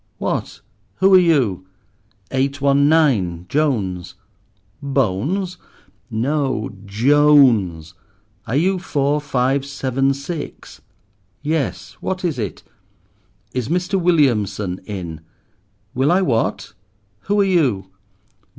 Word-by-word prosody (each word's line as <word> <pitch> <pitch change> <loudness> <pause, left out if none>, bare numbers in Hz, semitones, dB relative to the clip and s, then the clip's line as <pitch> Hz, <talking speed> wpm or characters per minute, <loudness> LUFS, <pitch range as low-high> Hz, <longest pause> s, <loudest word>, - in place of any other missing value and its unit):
"What! - - -3 0.3
who 190 0 +3
are 185 - +9
you?" 125 - +1 0.6
"Eight 135 +1 0
one 140 +1 +3
nine, 105 - +2
Jones." 95 - -1 0.7
"Bones?" 140 - -1 0.5
"No, 130 0 -1 0.2
_J_ones. 115 - +3 0.5
Are 115 - -2
you 185 +5 +2
four 145 -3 0
five 135 -1 0
seven 135 -1 -1
six?" 145 +3 -7 0.6
"Yes; 155 -2 -2
what 185 -1 -3
is 155 -7 -1
it?" 100 -8 -5 0.9
"Is 125 -2 -2
Mr. 180 +3 0
Williamson 105 - +1
in?" 85 -6 -6 0.7
"Will 135 +5 +2
I 190 +2 +3
what—who 105 - -3
are - - +5
you?" 135 - +1
135 Hz, 95 wpm, -20 LUFS, 105-155 Hz, 0.9 s, are